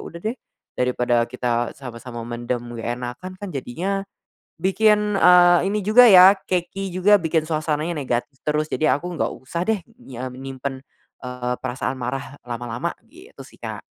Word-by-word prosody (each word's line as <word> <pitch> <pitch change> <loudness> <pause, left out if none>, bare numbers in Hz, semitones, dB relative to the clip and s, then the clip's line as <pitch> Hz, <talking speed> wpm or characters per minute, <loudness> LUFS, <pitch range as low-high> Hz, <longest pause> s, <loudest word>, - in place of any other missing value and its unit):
udah 170 - -9
deh, 220 +6 -3 0.4
dari 125 0 +1
pada 120 -1 +2
kita 120 -1 -1
sama-sama 120 -2 -8
mendem 120 +1 -3 0.2
gak 115 - -5
enakan 125 +9 -6
kan 205 0 -7
jadinya 180 +9 -3 0.6
bikin, 210 +2 +3
eee, 175 0 +7
ini 210 -1 -1
juga 240 +3 +7
ya, 185 0 +9
keki 185 +2 -2
juga 200 +2 +5
bikin 160 -1 0
suasananya 155 +1 -1
negatif 135 -3 -3
terus 150 0 -1
jadi 155 -2 +2
aku 175 +4 -6
gak - - 0
usah 150 +6 -5
deh 220 -3 +1 0.2
nya 130 - -7
menyimpan, 135 +1 -6 0.4
eee, 125 -1 -3
perasaan 130 +1 -3
marah 135 +3 -5
lama-lama, 120 +6 -4
gitu 365 +9 -14
sih - - -18
Kak. - - -6
150 Hz, 155 wpm, -22 LUFS, 125-185 Hz, 0.6 s, ya